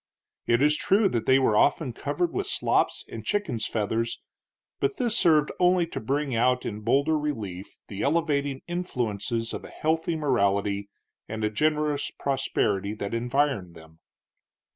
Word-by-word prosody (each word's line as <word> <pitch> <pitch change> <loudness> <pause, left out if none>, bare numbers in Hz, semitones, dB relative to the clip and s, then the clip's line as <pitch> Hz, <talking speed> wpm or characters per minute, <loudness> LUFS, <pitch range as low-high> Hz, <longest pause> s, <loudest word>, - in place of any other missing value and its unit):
It 120 +3 +3
is 150 0 +4
true 200 +6 +3
that 115 -6 -2
they 130 - +6
were 130 -5 +2
often 140 +2 +2
covered 350 - -2
with 390 0 -2
slops - - 0
and - - -8
chickens' 155 - -1
feathers, 115 +2 -1 0.6
but 140 0 0
this 235 -3 +1
served 155 -7 +4
only 180 -1 +4
to 165 - -6
bring 135 +3 -1
out 125 +2 +2
in 105 -1 -4
bolder 140 +8 +2
relief 105 -11 -5
the 100 -1 -6
elevating 145 -3 0
influences 120 - -2
of - - -5
a - - -10
healthy 160 +1 -1
morality 100 -8 0 0.4
and 110 0 -4
a 105 - +1
generous 150 +3 0
prosperity 105 -7 -1
that 100 0 -5
environed 120 -6 0
them. 80 0 -15
135 Hz, 150 wpm, -26 LUFS, 110-155 Hz, 0.6 s, they